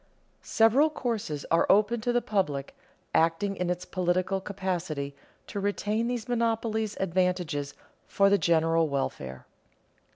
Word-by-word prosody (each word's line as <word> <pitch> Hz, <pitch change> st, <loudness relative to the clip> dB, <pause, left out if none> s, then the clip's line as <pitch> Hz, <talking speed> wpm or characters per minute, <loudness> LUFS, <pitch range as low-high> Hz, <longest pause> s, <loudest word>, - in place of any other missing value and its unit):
_Several 255 Hz, +8 st, +4 dB
courses 220 Hz, -, -3 dB
are 165 Hz, -, +4 dB
open 215 Hz, +3 st, +3 dB
to 245 Hz, +2 st, 0 dB
the 245 Hz, 0 st, +1 dB
public, 150 Hz, -10 st, -1 dB, 0.4 s
acting 165 Hz, +5 st, +2 dB
in 180 Hz, -1 st, -2 dB
its 180 Hz, 0 st, -2 dB
political 185 Hz, +1 st, 0 dB
capacity, 180 Hz, -8 st, -3 dB, 0.3 s
to 205 Hz, -, -5 dB
retain 205 Hz, +3 st, -1 dB
these 245 Hz, -1 st, -3 dB
monopoly 225 Hz, -2 st, 0 dB
advantages 180 Hz, -6 st, -1 dB, 0.3 s
for 200 Hz, -, +3 dB
the 200 Hz, 0 st, +4 dB
general 165 Hz, -1 st, +2 dB
welfare. 65 Hz, -, -4 dB
190 Hz, 125 wpm, -28 LUFS, 165-220 Hz, 0.4 s, Several